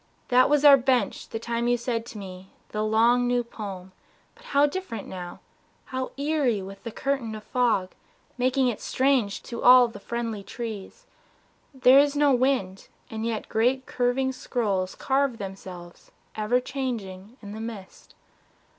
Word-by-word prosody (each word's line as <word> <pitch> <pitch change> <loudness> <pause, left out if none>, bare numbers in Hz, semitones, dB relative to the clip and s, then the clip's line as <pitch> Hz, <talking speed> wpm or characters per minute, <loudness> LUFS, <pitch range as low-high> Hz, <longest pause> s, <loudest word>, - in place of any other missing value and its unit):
That 255 +1 +5
was 295 0 +3
our 280 -1 +10
bench 255 -1 0
the - - -4
time 235 +1 -2
you 245 0 +3
said 235 -1 -3
to 230 - -9
me 190 -1 -9 0.2
The 215 0 -2
long 230 +3 +3
new 245 0 +1
poem 195 -5 -8 0.4
but 485 +1 -20
how 285 - +3
different 295 - -5
now, 180 -2 -8 0.4
How 260 -1 -4
eerie 280 -8 0
with 195 +1 -10
the 230 - -5
curtain 260 -3 -2
of 215 - -9
the - - -31
fog 225 -7 +1 0.4
Making 255 +1 +2
it 235 -4 -2
strange 260 -6 +1
to 235 - -7
all 250 0 +8
the 230 - -10
friendly 230 -3 -4
trees! 225 - -7 0.7
There 260 -1 +6
is 285 0 +3
no 290 -1 +4
wind, 245 -7 0 0.2
and 220 +1 -3
yet 225 -2 -3
great 255 +4 +1
curving 255 +2 0
scrolls 200 -7 -2
Carve 270 -2 0
themselves, 185 -3 -9 0.3
ever 215 +3 +1
changing, 235 -5 -5
in 205 -2 -10
the 220 +1 -7
mist. 220 -4 -9
235 Hz, 160 wpm, -26 LUFS, 210-260 Hz, 0.7 s, our